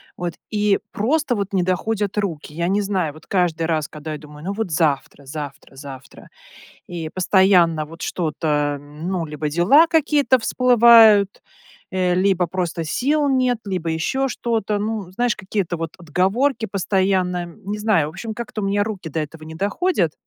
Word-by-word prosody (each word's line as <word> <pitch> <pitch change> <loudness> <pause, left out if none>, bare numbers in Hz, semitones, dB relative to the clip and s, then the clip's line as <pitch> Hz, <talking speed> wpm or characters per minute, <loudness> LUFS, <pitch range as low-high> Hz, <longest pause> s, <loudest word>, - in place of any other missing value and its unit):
вот, 175 -1 -4 0.2
и 210 -2 +2
просто 275 +4 0
вот 200 -1 -3
не 185 -2 +2
доходят 200 +3 -1
руки. 165 -7 -3
Я 170 +2 -1
не 200 +3 +1
знаю, 185 -7 -1
вот 155 - -16
каждый 175 -4 0
раз, 155 -2 -1
когда 155 0 -8
я 150 - -4
думаю: 150 0 -13
"Ну, 200 - -2
вот 210 -5 -3
завтра, 145 -3 -1
завтра, 145 -1 -8
завтра". 135 -1 -11 0.6
И 170 -3 -5
постоянно 180 -3 +3
вот 165 +2 -11
что-то, 150 -3 -1
ну, 160 +5 -4
либо 150 0 -4
дела 190 - +5
какие-то 295 -5 +3
всплывают, 230 -4 +5 0.5
э, 185 -1 +1
либо 185 -1 +2
просто 170 -1 -3
сил 285 - +1
нет, 255 -2 +2
либо 185 -4 -3
еще 265 +12 -1
что-то, 225 -4 -1
ну, 210 -3 -3
знаешь, 240 +3 0
какие-то 190 -3 -3
вот 165 -1 -4
отговорки 215 - 0
постоянно. 185 -2 0
Не 205 +4 -7
знаю, 210 -8 +2
в - - -7
общем, 215 +6 -6
как-то 230 -2 -5
у - - -2
меня 205 +1 +1
руки 195 -6 -5
до 160 +1 -3
этого 155 +1 -7
не 160 0 -9
доходят, 200 - 0
185 Hz, 165 wpm, -21 LUFS, 160-215 Hz, 0.6 s, дела